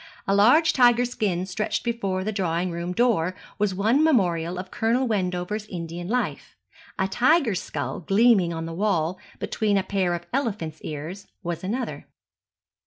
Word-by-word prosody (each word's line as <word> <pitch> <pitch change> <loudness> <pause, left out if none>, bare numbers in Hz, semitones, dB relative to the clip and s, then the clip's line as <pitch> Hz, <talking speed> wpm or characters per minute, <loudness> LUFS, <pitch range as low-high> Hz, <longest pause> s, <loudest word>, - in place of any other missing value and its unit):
A 195 - +2
large 245 +12 +5
tiger 245 -1 +5
skin 195 -7 -1
stretched 195 +3 -2
before 200 -6 -1
the 215 - -1
drawing 180 -3 -1
room 170 +1 -4
door 185 -5 +1 0.2
was 205 -2 +1
one 225 +10 +3
memorial 180 - +2
of 185 +1 -6
Colonel 235 +4 +1
Wendover's 195 0 -2
Indian 170 -1 -6
life; 245 +4 -2 0.4
a 190 - +1
tiger's 245 - +2
skull 145 -2 -4
gleaming 195 -1 +4
on 165 -1 -4
the 165 - -5
wall, 180 -2 0 0.2
between 210 -3 0
a 195 - +1
pair 190 -2 0
of 175 0 -7
elephant's 200 - -2
ears, 160 +6 -6 0.2
was 175 0 -4
another. 235 +7 -4
195 Hz, 155 wpm, -25 LUFS, 175-230 Hz, 0.4 s, large